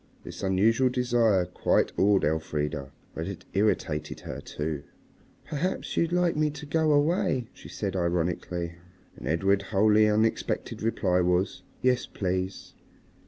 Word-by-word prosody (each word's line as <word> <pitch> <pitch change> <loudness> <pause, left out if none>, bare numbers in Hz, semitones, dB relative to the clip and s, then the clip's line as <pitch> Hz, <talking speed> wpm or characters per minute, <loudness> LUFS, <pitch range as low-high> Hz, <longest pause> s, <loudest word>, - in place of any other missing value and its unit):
This - - -8
unusual 110 +7 +3
desire 120 -6 +2
quite 90 - +1
awed 100 0 +3
Elfrida. 75 -3 -2 0.2
But 80 +2 -4
it 100 - -7
irritated 80 -7 0
her - - -6
too. 75 -1 -4 0.6
"Perhaps 170 +6 -2
you'd 170 0 +1
like 180 -1 +2
me 150 0 +2
to 150 0 -8
go 155 +1 +2
away," 145 - +2
she - - -13
said 100 -2 -3
ironically. 85 -1 -1 0.4
And - - -8
Edred's 95 +5 +2
wholly 105 +1 +4
unexpected 110 +2 0
reply 95 -5 +1
was, 90 +2 +1 0.2
"Yes, 125 -1 +2
please." 95 0 -3
100 Hz, 130 wpm, -27 LUFS, 90-125 Hz, 0.6 s, wholly